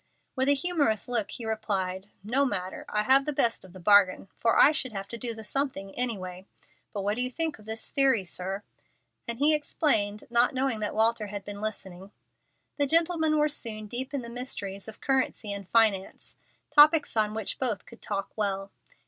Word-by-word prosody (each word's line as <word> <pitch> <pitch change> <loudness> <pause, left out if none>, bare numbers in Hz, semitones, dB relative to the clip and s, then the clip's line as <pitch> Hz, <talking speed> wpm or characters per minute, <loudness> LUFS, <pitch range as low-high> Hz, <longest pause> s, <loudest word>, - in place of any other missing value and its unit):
With 265 +1 +1
a 285 - +5
humorous 285 - 0
look 240 -4 0
he 235 - -7
replied, 200 -3 -2
"No 250 +7 +1
matter, 190 -8 -3
I 210 0 0
have 270 +4 +5
the - - +1
best 235 -4 +1
of 190 - -13
the 185 - -12
bargain, 195 0 +4
for 230 - +2
I 290 - +7
should 260 -6 -3
have 195 -1 -5
to 235 - -5
do 235 -1 -3
the 220 - -9
'something' 215 -6 -2
anyway. 190 -6 -3 0.4
But 200 -2 -4
what 205 +3 -1
do - - +1
you 250 - 0
think 320 0 -3
of 210 - -16
this 220 0 -1
theory, 265 -8 +3
sir?" 190 +3 -4 0.6
And 235 0 -4
he 295 +4 +4
explained, 220 -9 +1
not 240 +2 +3
knowing 260 -3 0
that 210 -1 -3
Walter 220 0 +2
had 200 -1 -7
been 205 0 -7
listening. 195 -3 -5 0.7
The 285 -1 +2
gentlemen 325 0 +2
were 300 0 +3
soon 225 -7 -3
deep 255 +5 -3
in 280 -3 -3
the 235 - -7
mysteries 205 -6 -4
of 220 - -10
currency 260 -6 0
and 200 -2 -8
finance, 215 -4 +1 0.4
topics 300 -1 +6
on 215 -1 +1
which 220 -3 -3
both 230 -7 -2
could 235 - -15
talk 200 -1 -3
well. 195 -2 -2
220 Hz, 195 wpm, -28 LUFS, 200-265 Hz, 0.7 s, I